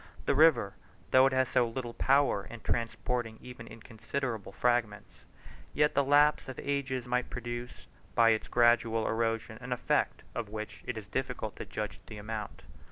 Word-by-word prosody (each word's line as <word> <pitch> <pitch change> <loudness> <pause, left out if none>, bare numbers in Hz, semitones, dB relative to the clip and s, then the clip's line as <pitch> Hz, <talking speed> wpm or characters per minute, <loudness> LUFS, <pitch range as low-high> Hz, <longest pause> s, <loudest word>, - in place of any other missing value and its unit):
The - - +3
river, 140 -9 +5 0.4
though 130 +1 +7
it 135 - -1
has 130 -1 +2
so 120 -1 +3
little 120 0 -5
power 135 -7 +2
in 120 -1 -10
transporting 115 0 -2
even 125 -2 -10
inconsiderable 115 0 -5
fragments, 105 -7 -1 0.5
yet 150 0 +4
in - - -25
the 140 - +3
lapse 145 +1 +4
of 130 - -7
ages 130 -3 -2
might 125 0 -1
produce 120 0 -6 0.3
by 115 -1 +6
its 110 - 0
gradual 120 -2 +3
erosion 115 0 -1
an 125 0 -7
effect 125 - 0
of 110 - -4
which 105 0 -6
it 125 - -3
is 105 -2 -7
difficult 125 -3 -3
to - - -7
judge 105 0 -5
the 110 - -9
amount. 105 0 -6
120 Hz, 165 wpm, -31 LUFS, 110-130 Hz, 0.5 s, though